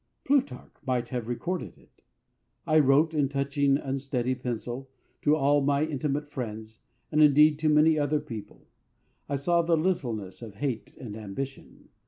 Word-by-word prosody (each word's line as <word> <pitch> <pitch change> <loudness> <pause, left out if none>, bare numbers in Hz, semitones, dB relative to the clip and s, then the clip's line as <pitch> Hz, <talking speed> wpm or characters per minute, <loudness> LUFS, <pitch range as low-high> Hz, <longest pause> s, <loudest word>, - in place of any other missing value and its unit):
Plutarch 260 - 0
might 125 -3 -1
have 125 -4 -4
recorded 170 +9 -4
it. - - -26 0.6
I 155 -1 +4
wrote 150 +3 +4
in 145 -3 +1
touchingly 140 0 +1
unsteady 135 -2 -2
pencil 125 +1 -5 0.3
to 150 +1 +4
all 145 0 +3
my 140 +2 +2
intimate 150 -1 -2
friends, 110 -4 -6 0.3
and 155 - +3
indeed 150 +1 +6
to 155 0 +2
many 155 +1 +5
other 145 +1 +1
people. 110 -7 -9 0.6
I 140 - 0
saw 170 +5 +2
the 165 0 +2
littleness 120 - -2
of 110 -4 -9
hate 125 0 -4
and 110 -5 -8
ambition. 110 +6 -7
140 Hz, 150 wpm, -27 LUFS, 125-150 Hz, 0.6 s, indeed